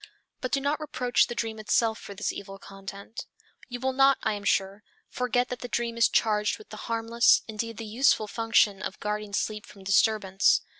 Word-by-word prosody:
But 255 Hz, -, -4 dB
do 275 Hz, -, +2 dB
not 285 Hz, +2 st, -1 dB
reproach 255 Hz, -5 st, +1 dB
the 240 Hz, -, -5 dB
dream 225 Hz, -2 st, -3 dB
itself 220 Hz, +1 st, +1 dB
for 200 Hz, -, -10 dB
this -, -, -2 dB
evil 195 Hz, 0 st, -8 dB
content. 195 Hz, +2 st, -9 dB, 0.4 s
You 245 Hz, 0 st, -5 dB
will 260 Hz, +1 st, -1 dB
not, 270 Hz, +1 st, +5 dB
I 220 Hz, -, +1 dB
am 205 Hz, -1 st, -6 dB
sure, 195 Hz, +1 st, +1 dB, 0.3 s
forget 250 Hz, 0 st, 0 dB
that 250 Hz, -, -5 dB
the 245 Hz, -, -6 dB
dream 235 Hz, -1 st, -2 dB
is 235 Hz, -, +4 dB
charged 210 Hz, -1 st, +1 dB
with 430 Hz, -, -16 dB
the -, -, -9 dB
harmless, 230 Hz, +1 st, +3 dB
indeed 225 Hz, 0 st, -5 dB
the 225 Hz, -, -6 dB
useful 220 Hz, 0 st, +2 dB
function 215 Hz, -3 st, +2 dB
of 190 Hz, -, -5 dB
guarding 210 Hz, -1 st, -3 dB
sleep 210 Hz, +1 st, -2 dB
from 195 Hz, -, -14 dB
disturbance. 195 Hz, 0 st, +3 dB
225 Hz, 195 wpm, -27 LUFS, 205-245 Hz, 0.4 s, not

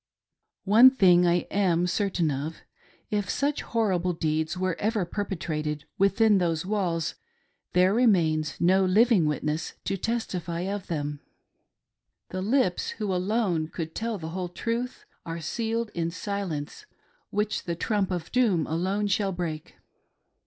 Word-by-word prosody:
One 225 Hz, +6 st, +8 dB
thing 180 Hz, -8 st, +5 dB
I 175 Hz, 0 st, +2 dB
am 180 Hz, -3 st, +2 dB
certain 180 Hz, -4 st, 0 dB
of; 145 Hz, +4 st, -4 dB, 0.3 s
— -, -, -33 dB
if 200 Hz, -, -5 dB
such 285 Hz, +1 st, 0 dB
hor 225 Hz, -3 st, 0 dB
rible 180 Hz, -1 st, -1 dB
deeds 160 Hz, +2 st, 0 dB
were 185 Hz, -1 st, 0 dB
ever 215 Hz, -3 st, 0 dB
perpetrated 160 Hz, -6 st, -3 dB
within 200 Hz, +1 st, +4 dB
those 165 Hz, -2 st, 0 dB
walls 180 Hz, -5 st, -1 dB, 0.6 s
there 185 Hz, +2 st, +4 dB
remains 170 Hz, -10 st, +2 dB
no 190 Hz, +2 st, +4 dB
living 200 Hz, 0 st, +4 dB
vsritness 150 Hz, +1 st, -2 dB
to 195 Hz, -, -1 dB
testify 180 Hz, -6 st, -3 dB
of 195 Hz, +1 st, -4 dB
them. 145 Hz, -3 st, -3 dB, 1.1 s
The 185 Hz, -, -4 dB
lips 215 Hz, -3 st, +1 dB
of -, -, -20 dB
who 210 Hz, -4 st, -1 dB
alone 185 Hz, -3 st, 0 dB
could 160 Hz, -1 st, -6 dB
tell 225 Hz, -1 st, -2 dB
the 160 Hz, -3 st, -6 dB
whole 180 Hz, +1 st, -4 dB
truth 235 Hz, +7 st, -3 dB, 0.2 s
are 165 Hz, 0 st, -5 dB
sealed 225 Hz, +6 st, -2 dB
in 165 Hz, -1 st, -1 dB
silence 195 Hz, -, -5 dB, 0.4 s
which 210 Hz, +1 st, -1 dB
the 170 Hz, -, -2 dB
trump 205 Hz, +2 st, 0 dB
of 175 Hz, -3 st, -4 dB
doom 215 Hz, -10 st, +2 dB
alone 190 Hz, +6 st, -1 dB
shall 200 Hz, 0 st, +1 dB
break. 170 Hz, -4 st, -5 dB
185 Hz, 145 wpm, -27 LUFS, 165-210 Hz, 1.1 s, One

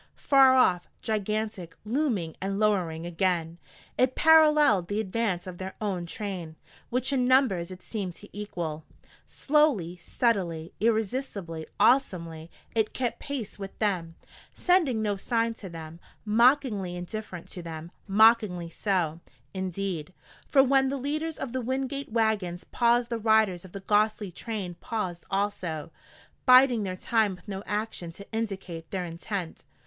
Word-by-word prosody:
Far 270 Hz, -2 st, +6 dB
off, 180 Hz, -9 st, +3 dB, 0.2 s
gigantic, 215 Hz, -5 st, -2 dB
looming 220 Hz, -, -1 dB
and 195 Hz, +1 st, -2 dB
lowering 180 Hz, -6 st, +1 dB
again, 170 Hz, -1 st, -1 dB, 0.4 s
it 255 Hz, 0 st, +3 dB
paralleled 300 Hz, -, +5 dB
the 205 Hz, +2 st, -1 dB
advance 205 Hz, -3 st, -1 dB
of 180 Hz, -2 st, -8 dB
their 190 Hz, 0 st, -6 dB
own 190 Hz, -5 st, -2 dB
train, 180 Hz, -5 st, -5 dB, 0.3 s
which 255 Hz, +3 st, 0 dB
in 250 Hz, -2 st, +2 dB
numbers 250 Hz, -10 st, +3 dB
it 185 Hz, -1 st, -10 dB
seemed 195 Hz, -5 st, -4 dB
to 205 Hz, -, -13 dB
equal. 170 Hz, -7 st, -4 dB, 0.4 s
Slowly, 275 Hz, -, +2 dB
steadily, 175 Hz, -4 st, -1 dB
irresistibly, 215 Hz, -7 st, -1 dB
awesomely, 170 Hz, -9 st, +2 dB, 0.2 s
it 220 Hz, -2 st, 0 dB
kept 245 Hz, -2 st, -2 dB
pace 260 Hz, -8 st, -5 dB
with 195 Hz, -1 st, -7 dB
them, 180 Hz, -6 st, -1 dB, 0.4 s
sending 315 Hz, -12 st, +2 dB
no 205 Hz, -2 st, 0 dB
sign 230 Hz, +2 st, 0 dB
to 205 Hz, -4 st, -9 dB
them, 165 Hz, 0 st, -9 dB, 0.3 s
mockingly 225 Hz, -4 st, +3 dB
indifferent 180 Hz, 0 st, -6 dB
to 180 Hz, -, -7 dB
them 165 Hz, 0 st, -7 dB, 0.2 s
mockingly 210 Hz, -4 st, +4 dB
so, 170 Hz, -3 st, -1 dB, 0.3 s
indeed; 185 Hz, -3 st, -3 dB, 0.3 s
for 270 Hz, -2 st, +5 dB
when 270 Hz, 0 st, +3 dB
the 275 Hz, -, -2 dB
leaders 305 Hz, +4 st, -3 dB
of 255 Hz, -3 st, -5 dB
the 260 Hz, -, -1 dB
Wingate 265 Hz, +2 st, -3 dB
wagons 215 Hz, -6 st, 0 dB
paused 240 Hz, 0 st, +2 dB
the 230 Hz, -, -1 dB
riders 220 Hz, -5 st, +3 dB
of 185 Hz, -, -12 dB
the 200 Hz, -, -7 dB
ghostly 210 Hz, 0 st, +1 dB
train 200 Hz, -1 st, -5 dB
paused 185 Hz, -7 st, -4 dB
also, 185 Hz, -6 st, -2 dB, 0.6 s
biding 255 Hz, -2 st, +7 dB
their 185 Hz, -2 st, -3 dB
time 215 Hz, -2 st, +1 dB
with 175 Hz, -, -20 dB
no 195 Hz, -1 st, -4 dB
action 210 Hz, -4 st, -3 dB
to 200 Hz, +4 st, -11 dB
indicate 195 Hz, -7 st, -4 dB
their 185 Hz, -2 st, -3 dB
intent. 170 Hz, +1 st, -5 dB
205 Hz, 140 wpm, -27 LUFS, 175-235 Hz, 0.6 s, biding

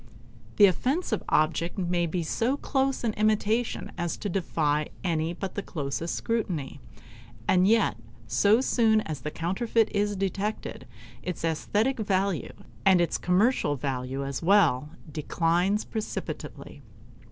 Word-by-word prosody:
The 205 Hz, -, +8 dB
offensive 250 Hz, -, +1 dB
object 165 Hz, +3 st, +1 dB
may 175 Hz, -2 st, 0 dB
be 170 Hz, +1 st, -2 dB
so 235 Hz, -, 0 dB
close 270 Hz, -2 st, 0 dB
an 225 Hz, -2 st, 0 dB
imitation 215 Hz, +2 st, 0 dB
as 175 Hz, -1 st, -2 dB
to 205 Hz, -, -4 dB
defy 155 Hz, -5 st, 0 dB, 0.2 s
any 165 Hz, -2 st, 0 dB
but 185 Hz, +2 st, -5 dB
the 205 Hz, -, -3 dB
closest 160 Hz, -1 st, -3 dB
scrutiny; 180 Hz, -, -2 dB, 0.7 s
and 185 Hz, 0 st, +4 dB
yet 220 Hz, -, +3 dB, 0.3 s
so 205 Hz, -, +4 dB
soon 225 Hz, -4 st, +3 dB
as 155 Hz, -9 st, -5 dB
the 150 Hz, -, -3 dB
counterfeit 210 Hz, +8 st, 0 dB
is 205 Hz, 0 st, +1 dB
detected, 195 Hz, -7 st, -3 dB, 0.3 s
its 180 Hz, 0 st, -4 dB
aesthetic 210 Hz, -, 0 dB
value, 195 Hz, -4 st, 0 dB, 0.3 s
and 190 Hz, -2 st, +5 dB
its 175 Hz, -, +1 dB
commercial 185 Hz, -, +2 dB
value 135 Hz, 0 st, -3 dB
as 140 Hz, -1 st, -4 dB
well, 165 Hz, -7 st, +4 dB, 0.2 s
declines 175 Hz, +6 st, +1 dB
precipitately. 220 Hz, -1 st, -6 dB
185 Hz, 130 wpm, -27 LUFS, 160-215 Hz, 0.7 s, The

